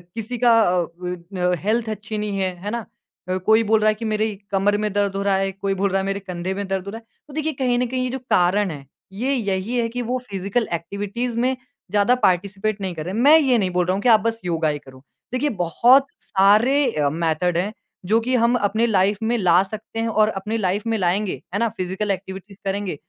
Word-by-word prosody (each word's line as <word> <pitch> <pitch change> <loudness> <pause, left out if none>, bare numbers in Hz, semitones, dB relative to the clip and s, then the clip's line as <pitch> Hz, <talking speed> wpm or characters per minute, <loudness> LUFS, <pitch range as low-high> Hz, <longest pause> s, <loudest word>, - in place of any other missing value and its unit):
किसी 230 +2 -4
का 235 -2 +5
अ, 180 -4 +2 0.2
बन 180 +1 -6
अ, 180 0 +2
हेल्थ 220 +2 0
अच्छी 215 +1 -5
नहीं 210 -1 -2
है, 185 -1 0
है 205 - -3
ना? 235 -2 -3 0.4
अ, 185 - 0
कोई 220 +1 +5
बोल 220 0 +5
रहा 215 - +3
है - - +3
कि, 225 +2 -6
"मेरी 215 0 0 0.2
कमर 200 +1 +2
में 210 - 0
दर्द 200 -1 0
हो 195 - -1
रहा 200 -1 +2
है।" 195 0 0
कोई 195 +1 -2
बोल 200 - +2
रहा 195 +1 +1
है, - - -4
"मेरे 195 0 -2
कंधे 185 -1 -4
में 200 0 -4
दर्द 190 -1 -2
हो 200 - -5
रहा 225 - -7
है।" 225 - -25 0.2
तो 290 - -13
देखिए 310 +1 -1
कहीं 245 -1 +2
ना 250 - +1
कहीं 255 +1 -2
ये 255 - -1
जो 265 +2 -4 0.2
कारण 185 +2 +2
हैं, 140 -3 -9 0.3
ये 250 +8 -1
यही 205 -1 -1
है 230 - +1
कि 245 +2 -4
वो 250 +2 -2
फिज़िकल 200 +4 -1
ऐक्टिविटीज़ 205 +8 -3
में 255 +2 +1 0.4
ज़्यादा 210 +4 +3
पार्टिसिपेट 200 +3 +1
नहीं 190 -2 -3
कर 155 -1 -5
रहे। 185 - -4
मैं 280 +9 +6
ये 265 -5 +3
नहीं 195 -4 +1
बोल 180 - +3
रहा 185 - +1
हूँ 195 - -2
कि 245 - +2
आप 220 -2 +7
बस 225 +1 -1
योगा 165 -2 0
ही 150 -1 -2
करो। 130 -1 -16 0.3
देखिए 285 +4 +1
बहुत 245 +11 +4
सारे 215 +9 +3
अ, 145 -2 +1
मेथड 165 +2 0
हैं, 195 +5 -1 0.3
जो 220 +5 +3
कि 255 +3 0
हम 235 0 +3
अपनी 220 0 +1
लाइफ़ 195 -1 +2
में 235 +2 +1
ला 180 -3 +4
सकते 215 +3 -7
हैं 225 - 0
और 215 -1 +3
अपनी 210 +2 -3
लाइफ़ 200 0 -1
में 225 - +1
लाएँगे, 185 -4 0
है 200 - 0
ना, 230 - +2
फिज़िकल 190 +3 -2
ऐक्टिविटीज़ 190 +1 -7
करेंगे, 195 -2 -2
205 Hz, 245 wpm, -22 LUFS, 190-230 Hz, 0.4 s, आप